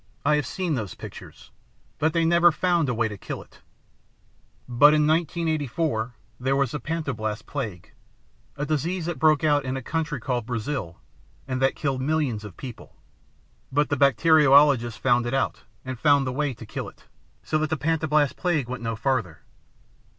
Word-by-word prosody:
I 150 +1 +4
have 145 -5 -2
seen 185 -4 -2
those 110 - -3
pictures. - - -11 0.5
But 160 +2 +2
they 165 +1 +1
never 170 +1 +5
found 170 -3 +1
a - - +1
way 115 0 +1
to 105 -2 -8
kill - - -6
it. - - -23 1.1
But 145 +5 +6
in 150 -1 +3
1984, 155 -6 -1 0.2
there 130 +2 +1
was 135 -3 +1
the 150 - -3
Pantoblast 120 -10 -3
Plague, 110 - -6 0.6
a 145 +1 -3
disease 160 +4 -1
that 175 -1 -4
broke 155 -1 +4
out 145 -2 +3
in 130 0 -3
a 130 - -6
country 160 0 -2
called 120 -1 -2
Brazil 115 - -3 0.5
and 130 -1 -2
that 135 - +2
killed 135 -3 -2
millions 140 -7 0
of 105 -4 -10
people. 125 -4 -10 0.8
But 145 +2 +1
the 145 - +1
bacteriologists 140 -2 +5
found 120 -2 +2
it 125 - -1
out, 135 - -1 0.2
and 130 -2 -5
found 145 -2 +4
the 130 - -2
way 140 -1 -1
to 115 - -10
kill - - -5
it, - - -23 0.4
so 155 - 0
that 155 0 -1
the 160 - -1
Pantoblast 155 -2 +1
Plague 160 -8 0
went 125 -2 -5
no 115 -1 -2
farther. 110 - -1
140 Hz, 175 wpm, -25 LUFS, 120-155 Hz, 1.1 s, But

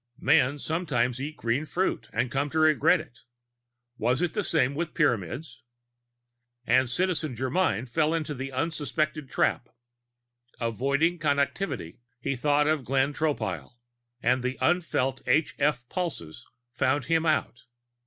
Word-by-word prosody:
Men 140 -1 +3
sometimes 135 -6 -1
eat 150 +2 -5
green 120 +5 0
fruit 180 +4 -2
and 120 - -1
come 140 +2 0
to 160 - -3
regret 155 -5 +5
it. 120 - -12 0.8
Was 125 +8 +1
it 175 - -1
the 210 - -1
same 145 -6 +1
with 160 +2 -3
Pyramids? 135 - -1 1.0
And 130 +2 +3
Citizen 160 -2 -1
Germyn 130 - 0
fell 155 +5 +1
into 155 -2 -2
the 135 0 -5
unsuspected 155 0 -2
trap. - - 0 0.9
Avoiding 140 - +1
Connectivity, 140 - -1 0.2
he 135 +2 -2
thought 145 +3 +2
of 155 -2 +1
Glenn 135 +3 +1
Tropile 120 - -2 0.5
and 125 +2 +3
the 125 +1 -2
unfelt 135 -3 +1
h 150 +5 +2
f 140 -4 +1
pulses 120 - -5 0.3
found 130 +1 +1
him 165 -1 +2
out. 155 -6 0
140 Hz, 135 wpm, -27 LUFS, 125-155 Hz, 1.0 s, regret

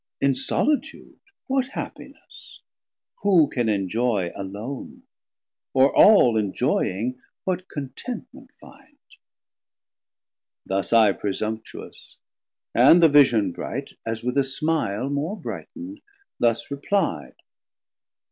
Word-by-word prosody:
In 140 0 +3
solitude 295 - -2 0.3
What 265 -1 0
happiness, - - -10 0.6
who 180 -7 +5
can 120 -5 -1
enjoy 100 -1 0
alone, 105 +8 -7 0.7
Or 135 +1 +4
all 160 - +6
enjoying, 110 +3 -1 0.2
what 185 0 -3
contentment 145 - -7
find? - - -18 1.7
Thus 95 +1 -2
I 110 -3 +6
presumptuous; 110 +3 -6 0.6
and 140 +9 +6
the 165 - +8
vision 120 -9 +4
bright, - - -6
As 115 0 -4
with 125 +3 0
a - - +3
smile 135 -5 -1
more 155 +9 -2
bright'nd, 270 - -8 0.4
thus 115 +3 +1
repli'd. 140 - -1
130 Hz, 95 wpm, -24 LUFS, 110-165 Hz, 1.7 s, the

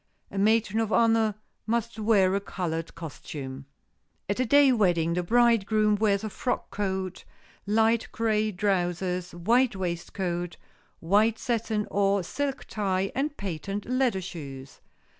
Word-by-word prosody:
A 195 - -3
matron 220 +1 +2
of 225 -1 -1
honor 225 -2 +3 0.3
must 230 0 -1
wear 205 -4 +3
a 200 - +2
colored 165 -4 -4
costume. 140 -4 -7 0.6
At 200 +4 -2
a 255 - +1
day 285 +1 +6
wedding 175 -8 +2
the 180 - 0
bridegroom 215 0 +3
wears 205 -1 +1
a 215 - -3
frock 245 - -3
coat, 190 -2 -3 0.4
light 225 +2 +2
gray 215 -1 +1
trousers, 180 -2 -1
white 230 +7 +2
waistcoat, 175 -1 -3 0.4
white 210 +6 +3
satin 225 -3 -1
or 200 -1 +2
silk 275 +8 -3
tie 195 -2 -1
and 290 +2 -2
patent 195 +2 -4
leather 250 -6 +1
shoes. 140 -7 -8
200 Hz, 130 wpm, -27 LUFS, 180-225 Hz, 0.6 s, day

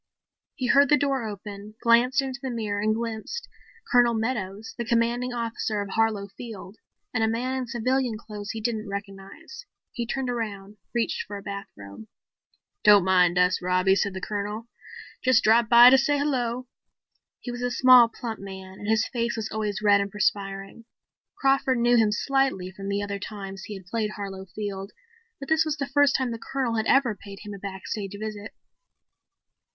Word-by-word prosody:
He 255 - -3
heard 280 +3 +5
the 295 - +6
door 270 -5 0
open, 205 0 -8
glanced 245 +4 +4
into 265 -1 -5
the 265 - -3
mirror 215 -4 -2
and 215 +1 +2
glimpsed 230 - -5 0.4
Colonel 240 -2 +5
Meadows, 220 -2 -3
the 235 - -3
Commanding 235 +1 0
Officer 230 -2 -2
of 200 -1 -4
Harlow 220 -1 +1
Field, 220 -3 -9 0.4
and 225 -2 +1
a - - +3
man 245 +4 -1
in 260 -1 -3
civilian 245 0 0
clothes 210 -2 -8
he 225 - -4
didn't 220 -2 -2
recognize. 200 - -8 0.3
He 240 -4 -4
turned 270 +1 -2
around, 210 -4 -4
reached 235 -1 -1
for 205 0 -6
a 200 - -10
bathrobe. 110 - -9 0.8
"Don't 205 -3 +7
mind 180 -2 +4
us, 180 0 +3
Robbie," 185 +1 +3
said 200 -1 -1
the 190 - -5
Colonel. 210 +3 -4 0.6
"Just 255 -2 +4
dropped 225 +1 +4
by 240 +1 +9
to 265 - +7
say 290 +2 +2
hello." 255 -4 -1 0.7
He 245 - -6
was 240 0 -6
a 245 - 0
small, 250 -1 +7
plump 230 -2 -6
man 190 -1 -9
and 205 - -7
his 220 0 +2
face 235 -1 -2
was 220 -1 -4
always 215 -1 -3
red 205 -1 +5
and 200 - -2
perspiring. 195 +1 -2 0.5
Crawford 270 -1 +2
knew 240 +1 +3
him 220 -2 +4
slightly 265 -5 0
from 195 +1 -7
the 200 0 -1
other 200 0 -4
two - - -5
times 195 -2 -8
he 210 - -7
had 190 -2 -11
played 215 +2 -2
Harlow 195 -2 -6
Field, 195 0 -6 0.5
but 275 - -7
this 315 0 +3
was 310 -1 -2
the 280 - -2
first 285 0 +3
time 260 -2 0
the 230 - -5
Colonel 255 -2 -2
had 220 - 0
ever 270 -5 +4
paid 200 -1 -11
him 210 -1 -7
a 200 - -8
backstage 195 +1 -5
visit. 215 -1 -6
220 Hz, 185 wpm, -26 LUFS, 200-245 Hz, 0.8 s, by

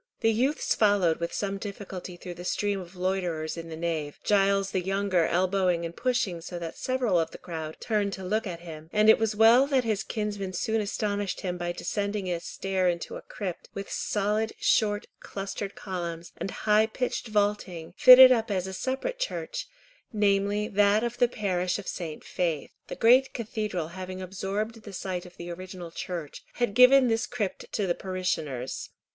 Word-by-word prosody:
The 225 - +4
youths 255 +7 +1
followed 200 -6 +3
with 170 0 -2
some 200 -1 -2
difficulty 195 -3 -7
through 180 0 -7
the 175 +1 -9
stream 200 +2 0
of 180 0 -10
loiterers 180 -4 -1
in 165 -1 -7
the 160 - -6
nave, 160 -3 -3
Giles 195 -1 +2
the 185 - 0
younger 190 -2 +1
elbowing 180 -1 +1
and 170 0 -6
pushing 225 -9 0
so 175 +1 -6
that 170 -1 -6
several 250 -8 +1
of 165 -1 0
the - - -10
crowd 160 -2 -6
turned 210 -3 0
to 190 - -6
look 215 +4 -1
at 170 -2 -6
him, 160 -2 -10
and 215 +1 +6
it - - +3
was 220 -1 0
well 230 +5 +6
that 270 -3 +2
his 215 -3 0
kinsman 205 -3 -3
soon 220 +4 0
astonished 205 -1 -2
him 180 -2 -2
by 175 0 -3
descending 200 +1 -2
a 170 - -1
stair 190 +1 -1
into 170 -1 -3
a - - -7
crypt, 185 -5 -6
with 200 0 -6
solid, 210 +2 0
short, 205 -1 +2
clustered 195 0 -5
columns, 170 -3 -5
and - - -3 0.2
high 215 +1 +5
pitched 245 +1 -3
vaulting, 205 -6 -1
fitted 255 0 +10
up 225 -3 +2
as 190 -3 0
a 190 - -6
separate 265 - -3
church, - - -3 0.4
namely 205 -1 +1
that 205 0 +3
of 240 0 -3
the 245 - +5
parish 185 -6 -1
of 205 - -8
St. 160 -4 -5
Faith. 165 -5 -2 0.2
The - - -5
great 255 +3 +5
cathedral, 210 -7 -3
having 185 +1 -7
absorbed 195 +4 -4
the 205 -2 -10
site 180 -1 -4
of 180 - -17
the 175 0 -6
original 180 -1 -8
church, 170 -3 -6
had 240 -4 -1
given 250 +3 +7
this 225 +1 +1
crypt 225 -6 -4
to 205 - 0
the 175 - +1
parishioners. 160 -9 -3
195 Hz, 185 wpm, -27 LUFS, 175-215 Hz, 0.4 s, fitted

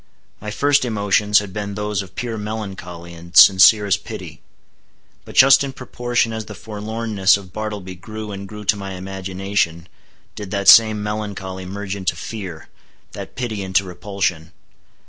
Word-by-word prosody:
My 105 - -5
first 145 +6 +2
emotions 105 -2 +2
had 100 -3 -1
been 100 -1 -4
those 105 -1 -2
of 95 -1 -12
pure 120 -2 -4
melancholy 95 -5 -7
and 85 +1 -6
sincerest 100 +1 +7
pity; - - -9 0.8
but - - -12
just 135 +1 +7
in 135 -1 -5
proportion 120 -3 -2
as 110 -1 -5
the - - -9
forlornness 105 -2 0
of 95 -3 -13
Bartleby 105 -4 -5
grew 110 +4 -8
and 100 0 -7
grew 105 +1 -9
to 105 - +3
my 100 -1 -6
imagination, 95 -2 -3 0.5
did 105 -2 -8
that 100 0 -2
same 110 -2 +7
melancholy 100 -3 -5
merge 100 +1 -5
into 95 -3 -2
fear, 90 -4 -7 0.4
that - - -9
pity 115 -5 -3
into 95 0 +1
repulsion. 90 -3 -3
100 Hz, 150 wpm, -20 LUFS, 95-110 Hz, 0.8 s, sincerest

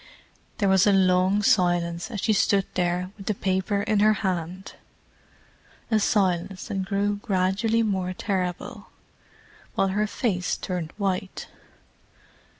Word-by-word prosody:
There 200 - +1
was 190 +1 +4
a - - +6
long 190 +1 +3
silence 175 -2 +1
as 210 -6 -5
she 220 - +2
stood 195 -1 +2
there 180 0 -1
with 195 - -11
the 215 - 0
paper 190 +2 -1
in 215 -1 +1
her 215 +1 +5
hand: 180 +1 -3 1.2
a 220 - +4
silence 190 -2 0
that 195 -2 -2
grew 205 +1 0
gradually 200 +4 +1
more 190 -4 -1
terrible, 190 +3 -3 0.9
while 195 - +2
her 210 +2 0
face 195 -6 -1
turned 180 -3 -4
white. 190 -2 -3
190 Hz, 130 wpm, -25 LUFS, 185-205 Hz, 1.2 s, a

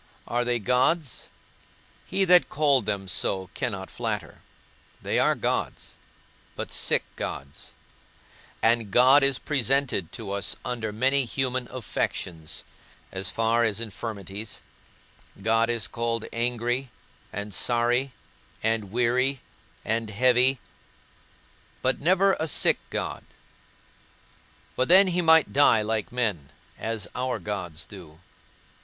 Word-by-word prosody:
Are 120 +1 0
they 120 0 +1
gods? 125 - 0 0.8
He 195 +1 +1
that 180 -3 +6
called 140 -6 +2
them 100 -2 -2
so 95 0 -1
cannot 100 -8 -4
flatter. - - -4 0.6
They - - 0
are - - +3
gods, - - -3 0.6
but - - -5
sick - - +2
gods; 70 +1 -6 0.9
and 115 -2 +3
God 130 +7 +6
is 135 -1 +2
presented 135 - 0
to 110 -4 -6
us 100 -1 -1
under 115 -3 -3
many 130 +5 +1
human 130 0 -2
affections, 90 -8 -4 0.5
as 95 0 -3
far 115 +1 +2
as 110 -2 +1
infirmities: 105 -1 -6 0.8
God 115 +3 +2
is 115 -1 0
called 115 -1 -2
angry, 120 +2 -1 0.4
and 100 0 -5
sorry, 120 +5 +1 0.5
and 110 -3 0
weary, 125 +3 +1 0.5
and 115 0 -1
heavy, 125 +4 +4 1.3
but 130 - +1
never 190 +5 +3
a 160 - -1
sick - - +3
God; - - -4 1.5
for 130 - +1
then 190 +2 +7
he 180 0 +1
might 160 -2 +5
die 135 -6 +5
like 110 +2 -2
men, 105 - -1 0.3
as 110 -2 -3
our 130 0 -2
gods 90 -6 -5
do. 85 -6 -12
120 Hz, 115 wpm, -26 LUFS, 105-130 Hz, 1.5 s, then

